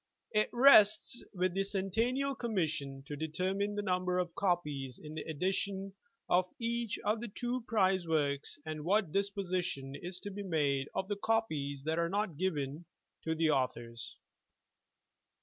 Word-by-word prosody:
It 215 0 +2
rests 240 -3 +6
with 185 -2 0
the 195 +1 +1
Centennial 225 +8 0
Commission 160 - -2
to 145 - -5
determine 185 +7 -1
the 205 - -1
num 180 -2 +1
ber 180 0 0
of 175 -2 -1
copies 150 -9 -1
in 150 -1 -9
the 155 - -4
edition 190 +4 -2 0.3
of 180 +1 +3
each 235 -2 -1
of 215 +2 +1
the 240 - -4
two 245 +3 -3
prize 190 -5 +2
works, 145 -3 0
and 155 -1 -4
what 195 0 +2
disposition 185 -8 -1
is 175 +5 -5
to 205 - -6
be 200 +1 -5
made 145 -7 0
of 190 - -1
the 205 0 -2
copies 155 -12 0
that 160 +2 0
are 170 0 +1
not 200 -3 -1
given 150 -2 -2 0.4
to 160 0 0
the 160 -1 +3
authors. 120 -4 -2
185 Hz, 155 wpm, -33 LUFS, 155-205 Hz, 0.4 s, rests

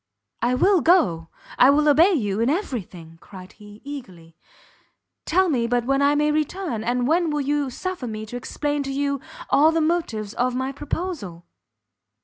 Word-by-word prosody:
"I 245 +2 +1
will 370 +6 +3
go, 180 - +3 0.3
I 255 - +7
will 300 +2 +3
obey 325 +7 +5
you 205 - -1
in 230 +3 +2
every 290 - -1
thing!" 165 -2 -14
cried 185 -2 -12
he, 210 0 -15
eagerly, 185 - -10 0.9
"tell 375 +3 +2
me 245 -8 0
but 240 0 0
when 275 +2 +1
I 285 +1 +3
may 300 +1 +2
return, 305 - -2
and 245 +1 0
when 330 +1 +2
you 290 +1 0
will - - -5
suffer 350 0 -5
me 215 -1 -5
to 220 - -9
explain 290 +4 -3
to 275 -1 -4
you 280 0 -1 0.3
all 310 +3 +5
the 325 - 0
motives 310 -11 -1
of 250 0 -1
my 260 +1 -2
proposal?" 280 - -5
275 Hz, 175 wpm, -23 LUFS, 220-305 Hz, 0.9 s, I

